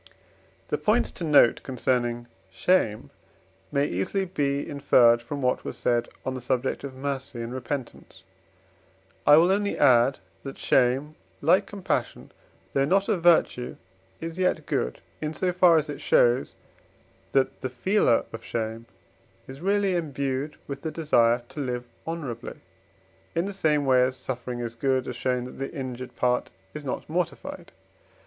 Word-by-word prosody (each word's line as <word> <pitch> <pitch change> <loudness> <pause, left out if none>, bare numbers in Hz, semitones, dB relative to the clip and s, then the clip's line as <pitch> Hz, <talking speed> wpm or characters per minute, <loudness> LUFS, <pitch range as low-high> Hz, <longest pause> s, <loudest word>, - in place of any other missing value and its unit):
The - - -1
points - - +2
to - - -8
note 145 -7 +5
concerning 120 -2 -1 0.2
shame 110 - +1 0.6
may 140 0 +2
easily 120 - -1
be 140 -5 -1
inferred 120 -4 +4
from 140 +3 -5
what 125 - +1
was - - -5
said 120 -1 0 0.2
on 130 - -1
the 130 - -5
subject 125 +1 -1
of 135 -2 -6
mercy 135 -2 -4
and 115 +1 -5
repentance. 130 +1 -6 1.0
I 145 - +9
will 175 +3 +5
only 200 +1 0
add 130 -1 +5 0.2
that 135 - -8
shame, 135 +4 +2 0.3
like 180 +7 +3
compassion, 200 -3 -3 0.4
though 135 - +3
not 195 +7 +2
a - - +3
virtue, 165 -7 +3 0.4
is 165 +2 -6
yet 185 0 +1
good, 60 - -2 0.2
in 155 0 -3
so 180 -1 0
far 175 -2 +6
as 155 0 +1
it 145 - -6
shows, 120 +2 +3 0.8
that 135 -1 +1
the 130 - -2
feeler 130 - +2
of 115 0 -7
shame 115 0 -4 0.6
is 135 +2 -10
really 200 0 +1
imbued 140 -2 -2
with 140 -1 -6
the 160 - -3
desire 120 -7 +2
to - - -9
live 125 -3 -3 0.2
honourably; 140 -8 -5 0.8
in 170 +2 +1
the 200 - -4
same 150 -6 +1
way 130 -1 +5
as 130 +1 +1
suffering 125 -1 -5
is 115 -1 -4
good, 130 +2 0
as 125 - -4
showing 125 0 -1
that 125 - -10
the 135 - -4
injured 130 -3 -6
part 125 0 +1 0.2
is 150 - -7
not 135 - -4
mortified. 170 +2 -4
135 Hz, 155 wpm, -26 LUFS, 125-160 Hz, 1.0 s, I